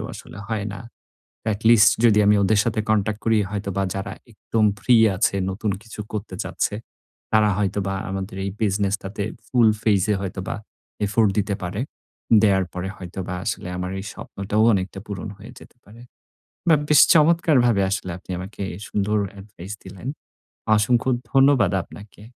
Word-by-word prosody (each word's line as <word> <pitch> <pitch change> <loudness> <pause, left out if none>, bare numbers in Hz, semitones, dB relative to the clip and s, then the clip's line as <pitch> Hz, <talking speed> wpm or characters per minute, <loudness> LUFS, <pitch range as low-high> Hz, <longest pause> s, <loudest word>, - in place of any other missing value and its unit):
ও - - -6
আসলে - - -11
হয় 110 -2 -2
না। 100 - -8 0.7
At 100 - -6
least 110 -3 +7
যদি 110 -3 +5
আমি 105 +1 +5
ওদের 105 +1 +3
সাথে 115 -2 -1
contact 110 0 +1
করি 115 -1 +3
হয়তো 100 -1 -4
বা 95 - +2
যারা 95 - -4 0.2
একদম 110 +1 0
ফ্রি 120 +5 +4 0.2
আছে 100 0 +1
নতুন 100 +2 -2
কিছু 110 -1 -12
করতে 105 -3 -5
চাচ্ছে, - - -2 0.6
তারা 110 -1 +4
হয়তোবা 100 -1 -1 0.2
আমাদের 95 0 -5
এই 100 - -2
business 100 -1 +1
টাতে 100 +1 -4 0.2
full 120 -3 +4
phase 105 -2 +2
এ - - +1
হয়তোবা 95 -1 -4 0.5
effort 110 +1 +2
দিতে 100 -1 0
পারে। 95 +6 -3 0.6
দেওয়ার 95 -3 +3
পরে 90 +1 -4
হয়তোবা 90 0 -6
আসলে 105 - -3
আমার 90 0 -3
এই 100 - -7
স্বপ্নটাও 105 +2 -2
অনেকটা 95 0 -2
পূরণ 100 +1 -5
হয়ে 105 +4 -12
যেতে - - -17
পারে। 110 +3 -15 0.7
But 155 - +6
বেশ 150 - +7
চমৎকারভাবে 150 - +4
আসলে 95 -2 -2
আপনি 95 - -11
আমাকে 100 +2 -7 0.2
সুন্দর 105 +1 0 0.2
advise 100 0 -9
দিলেন। 95 +6 -9 0.7
অসংখ্য 120 +4 +2 0.2
ধন্যবাদ 135 -8 +5
আপনাকে। 105 0 -14
105 Hz, 160 wpm, -23 LUFS, 95-110 Hz, 0.7 s, least